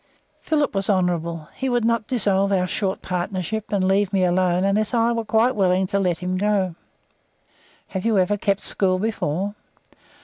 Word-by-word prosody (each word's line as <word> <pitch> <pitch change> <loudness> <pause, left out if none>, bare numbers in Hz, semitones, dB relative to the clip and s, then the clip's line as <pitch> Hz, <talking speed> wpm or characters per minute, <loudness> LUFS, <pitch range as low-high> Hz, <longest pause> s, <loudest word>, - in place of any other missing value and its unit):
Philip 300 -2 0
was 195 0 -1
honourable; 170 -4 0
he 265 - -3
would 240 -2 +1
not 230 -2 +1
dissolve 200 -5 +1
our 185 -2 +2
short 190 +1 -2
partnership, 185 +3 -3
and 195 -2 +1
leave 195 0 +2
me 195 -2 +2
alone 180 0 +2
unless 210 +4 +1
I 230 0 +3
was 230 -2 -2
quite 235 +3 +2
willing 190 -2 +2
to 200 +2 -1
let 180 -3 0
him 180 +1 -3
go. 195 -2 +1 1.2
"Have 190 -1 -4
you 225 -2 +2
ever 190 +2 +2
kept 200 -1 0
school 185 -2 +1
before?" 200 -2 -2
195 Hz, 170 wpm, -22 LUFS, 185-215 Hz, 1.2 s, I